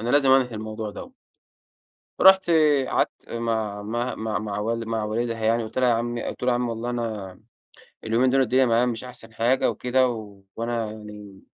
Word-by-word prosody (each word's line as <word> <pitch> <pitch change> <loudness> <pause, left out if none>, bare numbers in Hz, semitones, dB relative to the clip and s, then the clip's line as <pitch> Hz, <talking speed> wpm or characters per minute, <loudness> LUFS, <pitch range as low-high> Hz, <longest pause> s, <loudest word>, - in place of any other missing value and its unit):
أنا 115 - -3
لازم 140 -2 +4
أنهي 130 -3 +3
الموضوع 110 0 -5
دوَّة. 255 - -10 1.1
رُحت 190 -2 +7 0.4
قعدت - - -2
مع 110 -3 -2
عمها 120 +4 -3
مع 110 -1 -2
مع 105 -1 -4
وال 115 +1 -2
مع 110 -1 -1
والدها 115 +2 -2
يعني 115 +1 +2
قلت 110 +3 -8
لها 125 - +3
يا - - +4
عمي 120 +1 -2
قلت - - -6
له: 125 - +3
"عمي 120 0 0
والله 115 +1 -4
أنا 110 -6 -4 0.7
اليومين 120 +3 +2
دول 135 +1 +3
الدنيا 130 +1 +3
معايا 120 +1 +3
مش 120 0 -3
أحسن 120 -2 -11
حاجة 120 +4 +2
وكده، 130 +1 +1 0.5
وأنا 115 -1 -2
يعني، 105 -2 -11
115 Hz, 175 wpm, -24 LUFS, 110-125 Hz, 1.1 s, رُحت